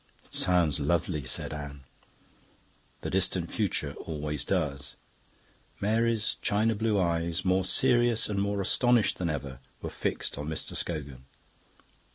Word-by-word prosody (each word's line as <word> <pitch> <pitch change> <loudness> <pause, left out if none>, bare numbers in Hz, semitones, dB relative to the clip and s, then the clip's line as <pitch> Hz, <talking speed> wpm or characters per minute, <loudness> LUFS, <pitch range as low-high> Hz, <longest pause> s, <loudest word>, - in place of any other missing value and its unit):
"It - - -17
sounds 85 -5 +3
lovely," 75 0 0
said 65 - -2
Anne. 70 -2 -7 1.2
"The - - -4
distant 95 -2 +1
future 90 -9 0
always 75 -3 -2
does." 70 -1 -2 0.8
Mary's 110 +1 +1
china 110 +2 +2
blue 110 -1 +1
eyes, 85 0 0
more 95 +1 +3
serious 120 +2 +3
and 100 -2 -1
more 100 0 0
astonished 120 +3 +3
than 90 -2 0
ever, 70 -4 -4 0.2
were - - -5
fixed - - -2
on 75 - -4
Mr. 80 0 -4
Scogan. 70 -6 -4
85 Hz, 130 wpm, -29 LUFS, 75-105 Hz, 1.2 s, sounds